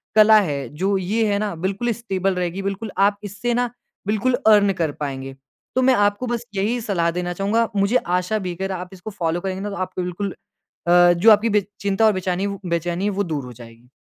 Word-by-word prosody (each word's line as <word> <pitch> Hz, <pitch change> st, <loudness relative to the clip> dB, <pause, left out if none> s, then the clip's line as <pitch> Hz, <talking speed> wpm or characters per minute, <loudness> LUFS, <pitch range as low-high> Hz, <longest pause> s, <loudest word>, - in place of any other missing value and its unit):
कला 215 Hz, 0 st, +7 dB
है, 145 Hz, -7 st, -3 dB
जो 190 Hz, +6 st, 0 dB
ये 205 Hz, +5 st, 0 dB
है 200 Hz, -, +1 dB
ना 210 Hz, -1 st, -2 dB
बिल्कुल 205 Hz, +5 st, -1 dB
स्टेबल 195 Hz, -4 st, -2 dB
रहेगी। 180 Hz, +1 st, -2 dB
बिल्कुल 200 Hz, +2 st, -4 dB
आप 200 Hz, +1 st, +3 dB
इससे 205 Hz, +4 st, -3 dB
न 245 Hz, 0 st, +1 dB, 0.4 s
बिल्कुल 215 Hz, +4 st, +1 dB
अर्न 205 Hz, -2 st, +6 dB
कर 165 Hz, -5 st, -1 dB
पाएँगे। 135 Hz, -1 st, -5 dB, 0.4 s
तो 255 Hz, -, +3 dB
मैं 260 Hz, 0 st, +5 dB
आपको 205 Hz, +2 st, +1 dB
बस 240 Hz, 0 st, -3 dB
यही 215 Hz, +5 st, 0 dB
सलाह 175 Hz, -6 st, 0 dB
देना 175 Hz, +1 st, -3 dB
चाहूँगा। 205 Hz, +5 st, +1 dB
मुझे 200 Hz, +4 st, +2 dB, 0.2 s
आशा 180 Hz, +4 st, -1 dB
भी 180 Hz, -3 st, -4 dB
अगर 190 Hz, +2 st, -3 dB
आप 180 Hz, -1 st, -5 dB
इसको 190 Hz, +3 st, -8 dB
फॉलो 175 Hz, -3 st, -2 dB
करेंगे 190 Hz, 0 st, -3 dB
ना 205 Hz, -, -3 dB
तो 200 Hz, -, -5 dB
आपको 185 Hz, -1 st, -3 dB
बिल्कुल 180 Hz, +3 st, -3 dB, 0.6 s
अ, 175 Hz, 0 st, +6 dB
जो 175 Hz, +6 st, +5 dB
आपकी 215 Hz, +2 st, +5 dB
बे -, -, +5 dB, 0.2 s
चिंता 200 Hz, +2 st, +1 dB
और 215 Hz, -, +5 dB
बेचैनी 185 Hz, 0 st, -1 dB
वो 200 Hz, 0 st, -4 dB
बेचैनी 175 Hz, +3 st, -1 dB
वो 200 Hz, -, +2 dB
दूर 155 Hz, -6 st, -3 dB
हो 125 Hz, -, -9 dB
जाएगी। 115 Hz, +1 st, -14 dB
195 Hz, 215 wpm, -22 LUFS, 175-210 Hz, 0.6 s, कला